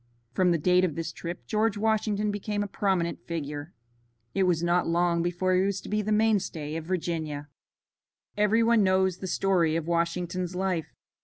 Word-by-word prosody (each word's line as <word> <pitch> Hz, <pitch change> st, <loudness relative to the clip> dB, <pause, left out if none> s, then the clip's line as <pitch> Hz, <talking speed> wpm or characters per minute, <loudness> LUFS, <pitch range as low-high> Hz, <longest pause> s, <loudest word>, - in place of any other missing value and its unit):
From 180 Hz, +6 st, +3 dB
the 170 Hz, -, +3 dB
date 180 Hz, +3 st, +3 dB
of 165 Hz, -6 st, 0 dB
this 165 Hz, -1 st, -3 dB
trip 170 Hz, +1 st, -7 dB
George 215 Hz, -1 st, +1 dB
Washington 210 Hz, -1 st, +1 dB
became 205 Hz, 0 st, -2 dB
a -, -, -4 dB
prominent 190 Hz, -4 st, -1 dB
figure. 150 Hz, -1 st, -4 dB, 0.6 s
It 190 Hz, -1 st, +2 dB
was 170 Hz, -1 st, +1 dB
not 175 Hz, +1 st, +2 dB
long 170 Hz, 0 st, +2 dB
before 175 Hz, +2 st, 0 dB
he 185 Hz, -, +4 dB
was 195 Hz, 0 st, 0 dB
to -, -, -10 dB
be 210 Hz, 0 st, +1 dB
the 215 Hz, +1 st, -3 dB
mainstay 205 Hz, -8 st, +1 dB
of 165 Hz, -1 st, -4 dB
Virginia. 160 Hz, -5 st, -3 dB, 0.9 s
Every 210 Hz, +2 st, +3 dB
one 230 Hz, -1 st, +4 dB
knows 190 Hz, -1 st, +2 dB
the 190 Hz, -, -5 dB
story 175 Hz, -3 st, +2 dB
of 165 Hz, -1 st, -1 dB
Washington's 175 Hz, +1 st, -1 dB
life. 180 Hz, -4 st, -2 dB
180 Hz, 175 wpm, -27 LUFS, 170-200 Hz, 0.9 s, he